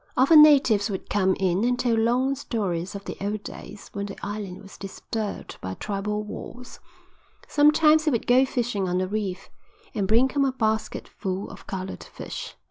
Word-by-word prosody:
Often 300 +4 +8
natives 265 -9 +5
would 190 -2 -5
come 190 -2 +2
in 190 +1 +1
and 245 +1 +2
tell 245 -2 +1
long 240 +4 +2
stories 195 -9 -3
of 200 - -7
the - - -5
old 205 +1 -2
days 205 - -10
when 200 0 -3
the 195 - -8
island 205 -2 -6
was 195 - -13
disturbed 205 +2 -6
by 95 0 -5
tribal 210 +1 -3
wars. 245 +4 -9 0.7
Sometimes 305 +1 +5
he - - +4
would 235 -6 -1
go 250 +2 +5
fishing 235 -7 -1
on 180 - 0
the 185 0 0
reef, 195 -2 -4 0.4
and 205 -5 -1
bring 230 +5 +4
home 275 +1 +1
a 265 - 0
basket 220 -3 -1
full 190 -1 -4
of - - -13
coloured 190 -1 -5
fish. - - -8
215 Hz, 180 wpm, -25 LUFS, 195-250 Hz, 0.7 s, Often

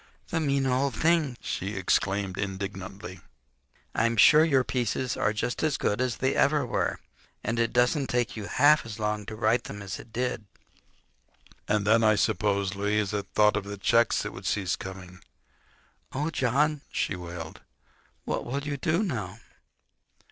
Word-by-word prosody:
"The 170 - 0
mean 140 -3 +1
old 130 +1 +1
thing!" 160 -6 +2
she 100 +3 -4
exclaimed 95 0 0
indignantly. 95 -1 -5 0.7
"I'm 115 +1 +1
sure 155 +8 +7
your 135 -5 +3
pieces 125 0 -1
are 105 - +1
just 115 +3 -2
as 155 -3 +1
good 105 +4 0
as 125 -2 -1
they 130 +1 +1
ever 150 +1 +2
were. - - -1 0.4
And 115 +1 -1
it 115 -1 +1
doesn't 125 +3 +2
take 120 -1 -1
you 105 -3 -5
half 145 +3 +4
as 115 -2 -8
long 105 -1 -2
to 110 - -5
write 115 +2 +1
them 105 - -7
as 95 -1 -6
it 115 - -13
did." 125 -2 -2 1.2
And 105 -1 +1
then, 115 +2 +4
I 110 -1 +5
suppose, 100 -1 +1
Louisa 105 0 0
thought 105 0 +5
of 105 -2 -2
the 100 0 -6
checks 115 +4 +3
that - - -4
would - - -7
cease 95 -2 0
coming. 95 -1 -9 0.9
"Oh, 150 +4 -1
John," 150 +1 +1
she 95 - -1
wailed, 85 -2 -8 0.6
"what - - -2
will 140 +3 -3
you 145 -1 -3
do 165 +8 +1
now?" 110 - -4
115 Hz, 160 wpm, -27 LUFS, 100-135 Hz, 1.2 s, sure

